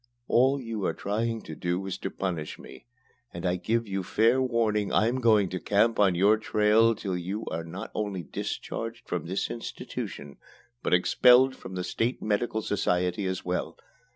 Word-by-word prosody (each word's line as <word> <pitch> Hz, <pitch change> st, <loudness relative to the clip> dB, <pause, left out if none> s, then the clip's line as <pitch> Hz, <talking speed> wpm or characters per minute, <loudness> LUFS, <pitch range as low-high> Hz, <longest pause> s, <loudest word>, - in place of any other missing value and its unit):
All 130 Hz, +4 st, +3 dB
you 115 Hz, -5 st, -5 dB
are -, -, -2 dB
trying 115 Hz, +3 st, -2 dB
to 80 Hz, -, -8 dB
do 90 Hz, +4 st, -2 dB
is 95 Hz, -, -4 dB
to -, -, -3 dB
punish 85 Hz, -5 st, -4 dB
me, -, -, -13 dB, 0.4 s
and 85 Hz, +1 st, -6 dB
I 90 Hz, 0 st, +2 dB
give 115 Hz, +5 st, -1 dB
you 95 Hz, -1 st, -2 dB
fair 115 Hz, +7 st, +2 dB
warning 115 Hz, -5 st, +1 dB
I'm 120 Hz, +5 st, +2 dB
going 110 Hz, -4 st, +4 dB
to 90 Hz, -, -4 dB
camp 110 Hz, +5 st, +2 dB
on 95 Hz, -3 st, +4 dB
your 100 Hz, +5 st, +4 dB
trail 110 Hz, +1 st, +3 dB
till 100 Hz, -3 st, -3 dB
you 95 Hz, +5 st, -4 dB
are 85 Hz, -, -3 dB
not 80 Hz, -, -7 dB
only 100 Hz, -4 st, -3 dB
discharged -, -, -5 dB
from -, -, -3 dB
this 95 Hz, +3 st, -2 dB
institution, 70 Hz, -10 st, -6 dB, 0.4 s
but -, -, +3 dB
expelled 125 Hz, +8 st, +5 dB
from 95 Hz, -, -9 dB
the 90 Hz, -, -2 dB
State 115 Hz, +7 st, -1 dB
Medical 110 Hz, +1 st, -1 dB
Society 90 Hz, -1 st, 0 dB
as 95 Hz, -1 st, -3 dB
well. 90 Hz, 0 st, -2 dB
105 Hz, 175 wpm, -27 LUFS, 90-115 Hz, 0.4 s, expelled